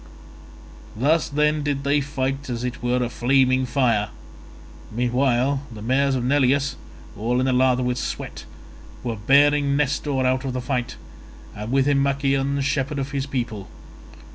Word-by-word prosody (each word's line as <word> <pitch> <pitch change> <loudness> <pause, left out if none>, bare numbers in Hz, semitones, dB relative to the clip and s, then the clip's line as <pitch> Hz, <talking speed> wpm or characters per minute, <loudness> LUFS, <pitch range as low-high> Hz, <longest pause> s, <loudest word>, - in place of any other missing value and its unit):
Thus 150 +8 +2
then 150 +1 +1
did 145 -1 -2
they 145 +1 +2
fight 135 -1 -3
as 120 -1 -3
it 125 0 -4
were 125 +1 +1
a - - 0
flaming 130 +1 +2
fire. 120 -5 +1 0.8
Meanwhile 125 +3 +1
the 105 -2 -9
mares 135 +3 +2
of 125 - -1
Neleus, 140 +1 +2 0.4
all 120 +4 0
in 130 - +1
a 130 - +2
lather 130 0 +3
with 125 0 -1
sweat, - - -5 0.6
were 120 -2 -2
bearing 140 +5 +3
Nestor 145 -2 0
out 130 0 +1
of 135 -2 -3
the 125 - -2
fight, 125 -1 -2 0.6
and 105 +3 -6
with 135 0 +3
him 140 -1 +3
Machaon 140 0 0
shepherd 140 +1 -1
of 135 0 -3
his 140 -1 -2
people. 120 -7 -4
130 Hz, 155 wpm, -23 LUFS, 125-140 Hz, 0.8 s, lather